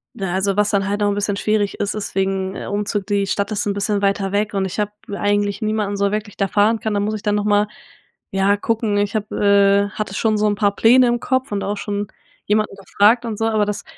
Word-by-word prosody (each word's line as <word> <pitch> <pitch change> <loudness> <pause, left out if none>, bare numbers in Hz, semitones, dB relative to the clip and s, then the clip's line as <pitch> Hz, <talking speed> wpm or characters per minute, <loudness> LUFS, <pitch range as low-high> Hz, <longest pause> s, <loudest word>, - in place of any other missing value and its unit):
Na, 195 -6 -3
also 195 +1 0
was 210 0 +3
dann 195 -1 +1
halt 205 +1 -2
auch 205 - +3
'n 200 - -1
bisschen 205 0 -1
schwierig 210 -1 0
ist, 205 0 -1
ist 215 - -5
wegen 190 0 -1
Umzug, 205 -1 -2
die 200 -1 +1
Stadt 200 +2 -1
ist 210 - -1
'n 200 - 0
bisschen 200 0 -1
weiter 195 -1 0
weg, 205 +1 0
und 195 -1 0
ich 190 - -5
hab 210 0 0 0.2
eigentlich 205 0 0
niemanden 215 -2 -1
so 200 0 +1
wirklich, 210 -1 -4
der 195 -1 0
fahren 215 +3 +2
kann. 220 -1 -2
Da 205 - +1
muss 210 +2 -1
ich 210 - -7
dann 210 -1 +1
noch 205 0 -1
mal, 205 0 +3 0.6
ja, 195 +1 +2
gucken. 215 0 -1
Ich 205 +2 0
hab 210 -1 -2
äh, 200 0 +3
hatte 210 -1 -5
schon 220 0 +1
so 210 0 +2
'n 205 - +1
paar 205 -1 +1
Pläne 250 +3 +5
im 240 0 +1
Kopf 260 +1 -1
und 200 -1 -2
auch 205 +1 -2
schon 205 0 -3 0.4
jemanden 215 -1 0
gefragt 205 +5 +2
und 220 -3 -4
so, 225 - +1
aber 215 -2 +2
das 210 0 -4
205 Hz, 250 wpm, -20 LUFS, 200-215 Hz, 0.6 s, Pläne